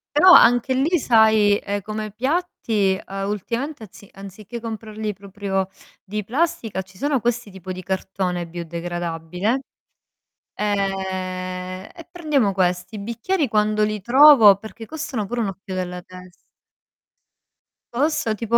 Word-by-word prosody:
Però 365 +5 +8
anche 245 -2 +6
lì 315 +6 +2
sai, 220 -4 +4
ehm, 200 0 -3
come 215 +1 -5
piatti, 230 - 0
uhm, 195 0 -5
ultimamente 235 - -3
anzi 200 -1 -13
anziché 200 +4 -9
comprarli 220 -1 -5
proprio 195 -1 -3 0.4
di 210 +1 -4
plastica 245 - -1
ci 185 0 -19
sono 280 -1 +1
questi 240 -1 -1
tipo 190 -1 -8
di 185 0 -6
cartone 185 -1 -2
biodegradabile, 175 +5 -3 0.9
ehm, 185 -2 -3
e 335 -2 -12
prendiamo 300 - 0
questi. 180 +1 0
I - - -5
bicchieri 235 - -1
quando 215 0 +2
li 210 0 -1
trovo 240 -2 +8
perché 220 +2 -10
costano 290 -8 -4
pure 235 +3 -3
un 210 - 0
occhio 195 0 -7
della 180 -1 -4
tes 185 0 -13 1.6
Costa 270 -4 +1
tipo, 230 +2 +1
210 Hz, 130 wpm, -22 LUFS, 190-235 Hz, 1.6 s, Però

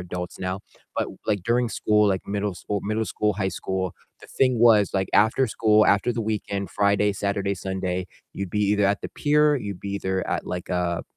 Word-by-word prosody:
adults 90 0 -6
now. 95 +1 -2 0.4
But, - - 0 0.2
like, 100 -4 0
during 120 +1 +2
school, 105 0 +2
like, 95 -1 -1
middle 100 -1 -2
school 100 +2 -3
middle 110 +2 -1
school, 105 -1 -1
high 95 -1 -1
school, 95 0 -3 0.3
the - - -13
thing 130 -3 +1
was, 110 -4 +5
like, 95 -1 0
after 110 +5 +4
school, 110 -1 +3
after 105 +5 +3
the 115 - -3
weekend, 105 -2 -3
Friday, 100 0 +2
Saturday, 100 0 -1
Sunday, 95 -1 -3 0.3
you'd 100 -2 -5
be 105 - -2
either 105 0 +2
at 100 +2 +2
the - - -5
pier, 150 0 +3
you'd 100 -7 -5
be 100 - -5
either 95 -1 -2
at, - - -2
like, 90 -1 -5
a 90 -1 -1
100 Hz, 200 wpm, -24 LUFS, 95-110 Hz, 0.4 s, was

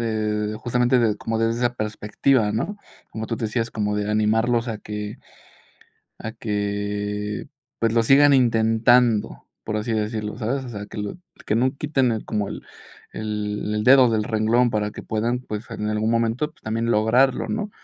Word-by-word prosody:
eh, 110 -2 -1
justamente, 125 +2 +2
de 110 -3 +2
como 115 0 -2
desde 115 +1 +1
esa 120 0 +1
perspectiva, 105 +2 0
¿no? 205 - -2 0.3
Como 110 0 -5
tú 115 - -3
decías, 115 +1 -2
como 105 -1 -1
de 105 0 -1
animarlos 115 +3 +2
a 110 -2 -3
que 105 0 -6 1.0
a 110 - -5
que, 105 0 -3 0.3
pues, 115 -1 +1
lo 115 - +4
sigan 140 +4 +6
intentando, 115 -1 +3 0.2
por 110 - -2
así 110 +2 -2
decirlo, 110 0 -2
¿sabes? 130 +4 -2
O 125 - -7
sea, 105 -2 -6
que - - -11
lo 105 +11 -4 0.3
que 105 - +1
no 130 +3 +1
quiten 135 -4 +1
el 110 - -4
como, 105 -2 -2
el - - -6 0.5
el 105 0 -3
dedo 130 -1 +7
del 110 -1 +1
renglón 115 +3 +2
para 105 -1 -1
que - - -9
puedan, 115 +3 -1
pues, 110 -2 -7
en 105 -1 -3
algún 110 +1 0
momento, 115 +6 0
pues, - - -29
también 115 +1 -1
lograrlo, 120 +5 +3
¿no? 215 -1 -2
110 Hz, 170 wpm, -23 LUFS, 105-120 Hz, 1.0 s, dedo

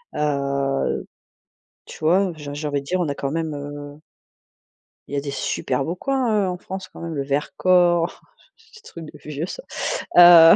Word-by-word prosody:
Heu, 140 -2 0 0.8
tu - - -11
vois, 180 +4 +3
j'ai 145 -2 -7
j'ai 150 +1 -3
envie 145 -1 0
de - - -13
dire 185 +4 0
on 170 - 0
a 140 - -1
quand 140 0 -3
même 160 -1 -2
heu 145 0 -7 1.1
il 140 - -5
y - - 0
a - - 0
des 140 -1 -4
super 135 -1 -1
beaux 165 +5 -3
coins 270 +5 0
hein, 210 -3 +2
heu, - - -1
en 180 -1 -2
France 190 +1 -7
quand - - -14
même, 165 -1 -4
le 140 - -1
Vercors, 175 +4 +2 0.3
ce 450 0 -19
truc 165 -2 -9
de - - -12
vieux 150 +1 -3
ça. - - -7 0.5
Heu, 170 -2 +10
160 Hz, 195 wpm, -22 LUFS, 145-180 Hz, 1.1 s, Heu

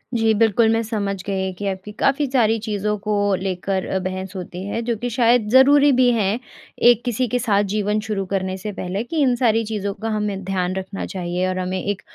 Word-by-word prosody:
जी। 225 -1 +3
बिल्कुल, 225 +1 +3
मैं 225 - +1
समझ 200 -3 -3
गई 190 -1 -2
कि 200 +3 -7
आपकी 190 +2 -6
काफ़ी 275 +2 +2
सारी 225 -4 +3
चीज़ों 210 -1 -2
को 210 +1 -2 0.3
लेकर 190 0 -2
अ, 190 - -1
बहस 185 +1 -5
होती 180 0 -6
है 225 +3 -2
जो 235 0 -1
कि 245 +3 -3
शायद 235 -2 +3
ज़रूरी 280 +4 +6
भी 250 -1 +5
है। 215 -5 +1 0.6
एक 240 -1 -1
किसी 245 +1 0
के 245 +2 -1
साथ 205 -4 +2
जीवन 210 0 0
शुरू 200 -3 -2
करने 190 -1 -1
से 210 +3 -5
पहले 185 +4 -3
कि 320 +7 -5
इन 255 -3 +3
सारी 230 -2 +2
चीज़ों 205 -2 -3
का 225 +3 -5
हमें 205 -2 -2
ध्यान 185 -1 -1
रखना 190 +1 -5
चाहिए। 180 0 -2
और 185 0 -2
हमें 185 0 -2
एक 200 -1 -2
210 Hz, 210 wpm, -21 LUFS, 190-230 Hz, 0.6 s, ज़रूरी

